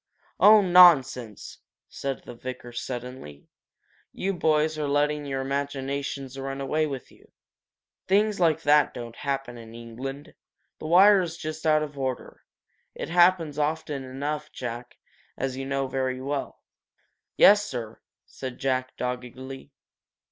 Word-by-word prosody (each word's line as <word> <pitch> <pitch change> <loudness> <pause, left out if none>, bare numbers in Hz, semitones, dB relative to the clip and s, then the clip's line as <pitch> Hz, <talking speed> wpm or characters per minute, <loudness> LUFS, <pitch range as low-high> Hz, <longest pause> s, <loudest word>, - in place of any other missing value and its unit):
"Oh, 215 0 +8
nonsense!" 145 - +4 0.3
said 135 -1 -5
the - - -9
vicar, 125 0 -8
suddenly. 120 - -7 0.7
"You 195 +1 -2
boys 155 -2 +1
are 150 - -1
letting 145 +1 0
your 135 -1 -2
imaginations 140 0 -4
run 135 0 -5
away 155 +3 0
with 135 -3 -7
you. - - -22 0.8
Things 205 +1 +2
like 165 -4 +2
that 145 -1 +4
don't 120 -1 -7
happen 135 -4 -4
in 115 0 -12
England. 130 +5 -8 0.5
The 155 - -6
wire 190 +4 +6
is 170 -2 -5
just 155 0 -5
out 155 0 +4
of 145 -2 -8
order. 130 -2 -4 0.5
It - - -6
happens 175 -3 +3
often 150 -2 -2
enough, 145 +4 -5
Jack, 120 0 -7 0.4
as 135 -1 -2
you 135 0 -5
know 135 0 -1
very 130 -1 -2
well!" 140 +1 -4 0.7
"Yes, 205 0 +7
sir," 120 - -6 0.2
said 130 -2 -8
Jack, 130 -1 -2
doggedly. 125 +2 -6
135 Hz, 135 wpm, -26 LUFS, 130-155 Hz, 0.8 s, Oh